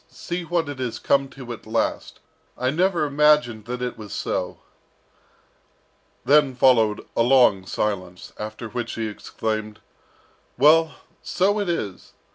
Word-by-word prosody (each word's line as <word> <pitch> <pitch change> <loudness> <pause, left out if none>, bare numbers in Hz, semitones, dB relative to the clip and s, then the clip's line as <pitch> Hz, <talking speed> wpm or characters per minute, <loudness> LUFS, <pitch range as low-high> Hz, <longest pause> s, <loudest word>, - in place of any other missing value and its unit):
see 175 0 -5
what 170 -1 -1
it 145 -2 -6
has 120 -3 -3
come 140 -1 +1
to 125 -3 -8
at 110 - -12
last! 115 +1 -2 0.4
and 125 - -4
I - - +3
never 175 0 +1
imagined 145 -7 +2
that 125 +1 -4
it 125 -2 -4
was 105 -2 -9
so!" - - -3 1.7
Then 145 -2 +4
followed 115 -5 +3
a - - +2
long 120 -7 +4
silence, 90 -5 -3
after 110 +2 -6
which 120 +1 -4
he 115 - -3
exclaimed, 110 0 -4 0.8
"Well, 155 +3 +5 0.3
so 200 +3 +1
it 200 -3 -2
is! 105 - -4
125 Hz, 140 wpm, -23 LUFS, 110-150 Hz, 1.7 s, Well